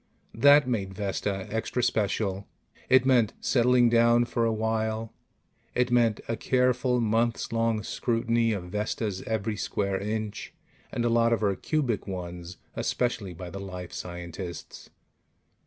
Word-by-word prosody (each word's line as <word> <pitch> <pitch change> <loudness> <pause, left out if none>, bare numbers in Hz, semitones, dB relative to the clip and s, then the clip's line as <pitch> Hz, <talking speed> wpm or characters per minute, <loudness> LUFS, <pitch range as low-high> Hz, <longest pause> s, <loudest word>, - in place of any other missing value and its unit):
That 140 +4 +6
made 100 -6 -2
Vesta 100 -1 -2
extra 110 +2 -1
special. 100 -2 0 0.4
It 130 0 +5
meant 125 -5 +3
settling 125 0 +4
down 120 +1 +4
for 120 -1 0
a 115 - +2
while. 110 0 -1 0.6
It 125 0 +1
meant 115 -3 +3
a 115 - -1
careful, 125 0 +1
months 115 +1 0
long 115 -2 +1
scrutiny 115 0 0
of 90 -4 -4
Vesta's 105 -1 -2
every 110 -1 -1
square 100 -2 -1
inch 105 0 -4 0.4
and 120 - -1
a - - +3
lot 115 0 +3
of 115 - 0
her 100 -2 +2
cubic 125 - -1
ones, 90 -2 -6 0.2
especially 105 -7 -1
by 90 +1 -8
the 100 - -6
life 90 -3 -7
scientists. 85 0 -7
110 Hz, 140 wpm, -27 LUFS, 100-120 Hz, 0.6 s, That